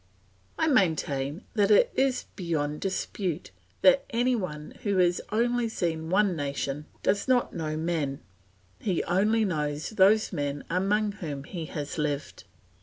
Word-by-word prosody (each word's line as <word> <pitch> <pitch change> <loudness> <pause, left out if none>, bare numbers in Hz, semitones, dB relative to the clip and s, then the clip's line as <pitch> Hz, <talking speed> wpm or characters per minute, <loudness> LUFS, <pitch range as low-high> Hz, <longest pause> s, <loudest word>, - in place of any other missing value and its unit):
I - - +2
maintain 160 - +1
that 205 -2 +3
it 210 - +5
is 265 -1 +1
beyond 150 -5 -2
dispute 185 -3 -3 0.3
that - - +6
any 245 0 +2
one 150 -8 -5
who 200 -2 0
has 180 -1 +3
only 240 +1 +1
seen 160 -6 -2
one 195 0 +3
nation 145 0 -3 0.2
does 200 +4 +1
not 255 -2 +2
know 155 -2 -3
men; 155 -4 -1 0.6
he 185 -5 0
only 215 +5 +2
knows 150 -3 -2
those 210 +1 +4
men 145 -3 -2
among 205 +4 +1
whom 155 -9 -6
he 165 +2 -6
has 150 0 -5
lived. 150 -1 -3
180 Hz, 140 wpm, -28 LUFS, 150-210 Hz, 0.6 s, that